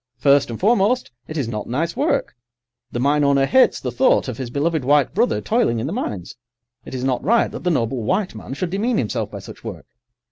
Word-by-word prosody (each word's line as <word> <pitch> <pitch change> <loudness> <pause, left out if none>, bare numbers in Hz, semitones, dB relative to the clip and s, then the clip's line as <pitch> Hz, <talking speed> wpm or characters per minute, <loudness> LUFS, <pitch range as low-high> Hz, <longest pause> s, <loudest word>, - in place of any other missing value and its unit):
First 140 -1 +4
and 115 - -5
foremost, 220 - +2 0.2
it 155 - -6
is 135 -6 -1
not 105 -2 -4
nice 160 +7 -1
work; - - 0 0.6
the 120 - -3
mine 145 +3 +2
owner 140 -1 +3
hates 260 - +4
the - - -4
thought 260 - +3
of 125 -2 -5
his 130 -3 -4
beloved 150 +3 0
white 145 0 +3
brother 235 +6 +1
toiling 225 - +1
in 115 - -2
the 155 - -3
mines. 105 - -4 0.5
It - - -8
is 125 - -4
not 130 -1 0
right 230 +3 +3
that - - -7
the 180 - +1
noble 125 -5 0
white 185 - 0
man 135 - -7
should 175 +3 -3
demean 215 +5 0
himself 105 -6 -1
by - - -8
such - - -11
work. - - -7
145 Hz, 220 wpm, -21 LUFS, 125-195 Hz, 0.6 s, First